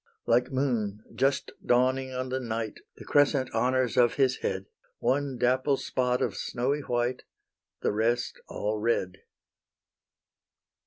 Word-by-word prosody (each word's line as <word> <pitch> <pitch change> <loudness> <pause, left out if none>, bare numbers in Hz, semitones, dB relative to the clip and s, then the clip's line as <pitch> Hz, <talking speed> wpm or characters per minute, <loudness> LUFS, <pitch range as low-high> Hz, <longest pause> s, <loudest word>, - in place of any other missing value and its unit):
Like 120 +2 +2
moon 115 -6 -1
just 135 0 +1
dawning 130 +2 +2
on 130 0 -3
the 130 +1 -1
night 115 -3 -4 0.2
The - - -12
crescent 145 -3 +3
honours 125 +1 +1
of 120 -1 +5
his 130 -2 +2
head; 95 0 -2 0.3
One 135 -1 0
dapple 130 +3 +2
spot 125 -1 0
of - - -1
snowy 140 +4 -1
white, 120 -1 -1 0.6
The - - +2
rest 115 +3 0
all 105 +1 -2
red. 95 -4 0
125 Hz, 125 wpm, -28 LUFS, 115-130 Hz, 0.6 s, of